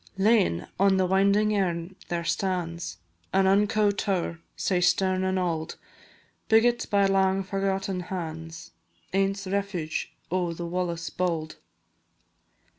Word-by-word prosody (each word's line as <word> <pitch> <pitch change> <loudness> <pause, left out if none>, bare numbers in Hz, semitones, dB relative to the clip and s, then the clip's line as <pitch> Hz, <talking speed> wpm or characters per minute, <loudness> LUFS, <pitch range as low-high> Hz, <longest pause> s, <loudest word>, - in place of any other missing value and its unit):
Lane, 195 - +3
on 195 0 +4
the 190 - +3
winding 200 +3 +3
Earn 175 -2 -1
there 170 -1 -2
stands 170 - -2 0.4
An 195 0 +4
unco 205 +2 +3
tow'r, 190 -4 -2 0.2
sae 180 -2 0
stern 185 +1 +2
an' 190 0 0
auld, 170 -3 -2 0.7
Biggit 240 +2 +3
by 200 -1 +3
lang 195 0 +2
forgotten 195 -1 -1
hands, 165 - -6 0.4
Ance 195 +1 +1
refuge 190 -5 -2 0.2
o' 175 -2 0
the 170 +1 -5
Wallace 170 -1 -3
bauld. 165 -3 -2
190 Hz, 115 wpm, -27 LUFS, 170-195 Hz, 0.7 s, on